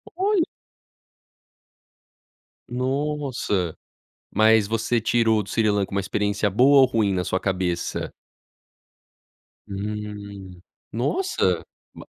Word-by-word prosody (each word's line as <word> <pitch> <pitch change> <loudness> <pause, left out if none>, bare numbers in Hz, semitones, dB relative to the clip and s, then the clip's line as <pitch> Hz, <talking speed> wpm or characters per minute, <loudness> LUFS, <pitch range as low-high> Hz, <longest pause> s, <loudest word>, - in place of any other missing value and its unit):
Olha. 390 0 +2 2.3
Nossa, 130 - -1 0.6
mas 110 0 +5
você 115 +2 0
tirou 110 -1 +2
o - - -1
do 100 - -13
Sri 110 -2 +2
Lanka 100 -1 +1
com 100 - -9
uma 100 - +2
experiência 105 +1 0
boa 130 +8 +5
ou 130 - +7
ruim 110 -5 +1
na 90 -1 -1
sua 95 +1 -1
cabeça? 90 -3 -2 1.6
Hum, 100 -2 -6 0.3
nossa 365 - 0 0.3
ma - - -11
105 Hz, 105 wpm, -24 LUFS, 100-125 Hz, 2.3 s, ou